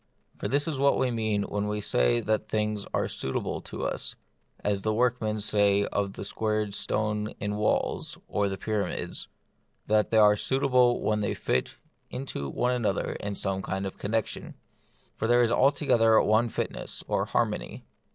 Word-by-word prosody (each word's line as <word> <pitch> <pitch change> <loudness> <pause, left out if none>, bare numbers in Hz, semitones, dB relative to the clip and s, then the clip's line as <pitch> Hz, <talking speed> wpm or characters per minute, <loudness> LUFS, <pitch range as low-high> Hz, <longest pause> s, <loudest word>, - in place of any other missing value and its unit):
For - - -2
this 145 +2 +1
is 150 -5 -2
what 140 0 +4
we 130 - +1
mean 110 -3 0
when 105 0 -2
we 105 0 -1
say - - +2
that 110 0 -1
things 105 -1 -1
are - - 0
suitable 65 - -3
to - - -6
us, - - -3 0.5
as 100 -1 0
the 110 +1 0
workmen 115 -3 +1
say 100 -1 +3
of 100 -1 -2
the - - -7
squared 105 -1 -1
stones 105 +1 -1
in 105 0 -2
walls 105 0 0
or 100 -1 0
the 95 - -4
pyramids, 105 -1 -3 0.6
that 105 0 +2
they 110 - +2
are 105 -1 +7
suitable 125 +1 +2
when 105 0 +1
they 105 - -1
fit 65 - -1 0.3
one - - -5
into 70 - -3
another 125 -3 0
in 100 0 -4
some 95 -1 -1
kind 95 0 -3
of 95 - -6
connexion. 110 +1 -2 0.6
For 110 - -1
there 120 +1 +5
is 115 - +2
altogether 125 -4 +4
one 110 +3 +3
fitness - - -4
(or - - 0
harmony.) - - -2
105 Hz, 170 wpm, -28 LUFS, 100-115 Hz, 0.6 s, are